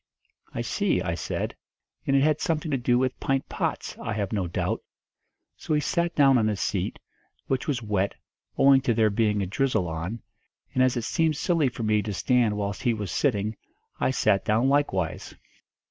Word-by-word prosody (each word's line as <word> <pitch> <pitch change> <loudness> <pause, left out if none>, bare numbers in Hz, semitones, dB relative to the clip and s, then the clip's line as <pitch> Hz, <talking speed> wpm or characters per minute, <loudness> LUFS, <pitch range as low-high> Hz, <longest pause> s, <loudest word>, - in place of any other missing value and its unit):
'I 120 - -1
see,' 190 - 0
I 85 -3 -1
said, 85 - -3 0.5
'and 135 - +3
it 135 - +4
had 155 0 +2
something 155 -1 -1
to 135 - +2
do 120 0 +2
with 130 0 0
pint 135 0 0
pots, - - -3
I - - -3
have 100 -1 -2
no 95 -4 0
doubt.' 85 - -2 0.8
So 155 - -1
he - - +3
sat 170 +3 0
down 135 -3 +5
on 110 -1 +2
a 105 - 0
seat, - - -2 0.5
which 130 -1 -1
was 130 -6 -1
wet, 100 -2 0 0.4
owing 135 -1 +6
to 120 -3 +1
there 110 -2 +3
being 105 -1 +1
a - - -1
drizzle 110 -1 0
on, 85 +8 -5 0.5
and 130 - +2
as 130 -1 +3
it 120 - -2
seemed 160 +4 +1
silly 165 -6 +2
for 120 -1 -6
me 105 -1 +2
to 105 0 -4
stand 120 -2 +2
whilst 100 -1 -3
he 120 -3 +1
was 105 -5 -4
sitting, 110 - 0 0.4
I - - +2
sat 100 -6 +2
down 115 +5 +2
likewise. 95 - 0
120 Hz, 190 wpm, -26 LUFS, 105-135 Hz, 0.8 s, owing